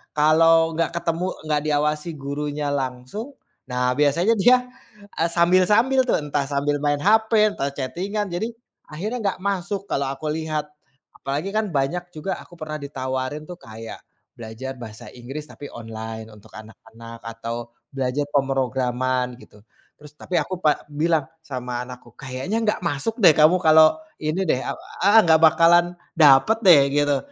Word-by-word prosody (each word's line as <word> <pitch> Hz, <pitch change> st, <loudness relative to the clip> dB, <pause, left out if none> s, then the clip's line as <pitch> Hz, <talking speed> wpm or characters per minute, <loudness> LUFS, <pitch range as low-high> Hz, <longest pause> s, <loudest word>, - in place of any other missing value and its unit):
kalau 165 Hz, +2 st, +4 dB
gak 165 Hz, -, +1 dB
ketemu, 170 Hz, +1 st, -1 dB, 0.2 s
gak 150 Hz, -1 st, +2 dB
diawasi 150 Hz, +2 st, 0 dB
gurunya 145 Hz, +1 st, -3 dB
langsung, 135 Hz, -, -5 dB, 0.3 s
nah 125 Hz, 0 st, 0 dB
biasanya 165 Hz, +9 st, +3 dB
dia, 250 Hz, +4 st, +6 dB, 0.6 s
eee, 165 Hz, -, +3 dB
sambil-sambil 185 Hz, +10 st, +3 dB
tuh -, -, +4 dB
entah 145 Hz, -1 st, -1 dB
sambil 145 Hz, +1 st, 0 dB
main 145 Hz, 0 st, +1 dB
HP, 220 Hz, +2 st, +3 dB, 0.2 s
entah 140 Hz, -, -2 dB
chatting-an, 190 Hz, +10 st, -3 dB
jadi 215 Hz, +7 st, -3 dB, 0.4 s
akhirnya 205 Hz, +11 st, -4 dB, 0.2 s
gak -, -, -19 dB
masuk 200 Hz, 0 st, -2 dB
kalau 140 Hz, -, -1 dB
aku 140 Hz, +3 st, -7 dB
lihat. 155 Hz, -1 st, -3 dB, 0.5 s
Apalagi 145 Hz, +7 st, -3 dB
kan 215 Hz, -3 st, 0 dB
banyak 140 Hz, +6 st, 0 dB
juga 170 Hz, +5 st, -4 dB
aku -, -, -17 dB
pernah 155 Hz, -1 st, -5 dB
ditawarin 130 Hz, 0 st, -4 dB
tuh 180 Hz, -, -8 dB
kayak 110 Hz, -3 st, -9 dB, 0.4 s
belajar 115 Hz, +4 st, -7 dB
bahasa 110 Hz, -2 st, -10 dB
Inggris 135 Hz, +5 st, -8 dB
tapi 145 Hz, -, -10 dB
online 110 Hz, -1 st, -7 dB
untuk 105 Hz, -1 st, -17 dB
anak-anak 110 Hz, +2 st, -12 dB
atau 115 Hz, +1 st, -6 dB, 0.2 s
belajar 135 Hz, +2 st, -1 dB
pemrograman 130 Hz, -2 st, 0 dB
gitu. 105 Hz, -, -18 dB, 0.4 s
Terus 150 Hz, -1 st, -15 dB
tapi 180 Hz, -, -5 dB
aku 185 Hz, -, -5 dB
pa 150 Hz, -1 st, +2 dB
bilang 155 Hz, 0 st, +1 dB, 0.2 s
sama 125 Hz, -3 st, -4 dB
anakku, 125 Hz, 0 st, -12 dB
"Kayaknya 130 Hz, +10 st, -4 dB, 0.2 s
gak -, -, -12 dB
masuk 145 Hz, +8 st, -2 dB
deh 170 Hz, -, +9 dB
kamu 155 Hz, +4 st, +5 dB
kalau 155 Hz, 0 st, +6 dB, 0.3 s
ini 155 Hz, +5 st, -1 dB
deh 130 Hz, -, +2 dB
aw" -, -, -3 dB, 0.3 s
heeh, 205 Hz, +3 st, +7 dB
gak 160 Hz, -1 st, +5 dB
bakalan 165 Hz, +2 st, +6 dB, 0.3 s
dapat 150 Hz, +7 st, +6 dB
deh 170 Hz, -6 st, +8 dB
gitu. 145 Hz, -1 st, +2 dB
150 Hz, 150 wpm, -22 LUFS, 130-170 Hz, 0.6 s, deh